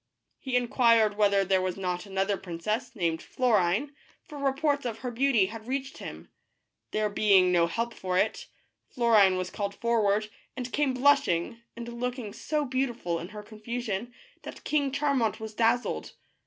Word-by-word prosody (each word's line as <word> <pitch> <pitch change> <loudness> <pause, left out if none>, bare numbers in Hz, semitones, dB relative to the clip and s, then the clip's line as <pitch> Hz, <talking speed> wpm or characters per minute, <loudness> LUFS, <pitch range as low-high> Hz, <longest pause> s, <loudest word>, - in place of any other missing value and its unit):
He 260 -2 -3
inquired 230 -3 +3
whether 200 -2 +3
there 190 0 +2
was 185 0 -2
not 180 0 -3
another 195 +1 0
princess, 195 +7 -4
named 165 -5 -1
Florine, 225 +1 +1 0.4
for 300 - -10
reports 280 +1 +1
of 235 -3 -3
her 250 - -2
beauty 240 -4 +3
had 220 +3 -8
reached 270 +1 -3
him. - - -9 0.6
There 215 0 0
being 200 -3 +4
no 170 -1 +4
help 230 +7 -2
for 185 -3 -2
it, - - 0 0.4
Florine 220 -7 +4
was 185 0 -3
called 200 -1 -3
forward, 215 -2 +1 0.3
and 250 -1 -5
came 285 -3 +1
blushing, 250 -6 +2
and 235 0 -7
looking 250 -4 -3
so 300 -1 -2
beautiful 245 -10 -2
in 170 - -6
her 210 +1 -9
confusion, 220 0 -5 0.3
that - - -10
King 285 -3 0
Charmant 275 -6 0
was 220 -1 -7
dazzled. 235 +2 0
220 Hz, 155 wpm, -28 LUFS, 195-250 Hz, 0.6 s, being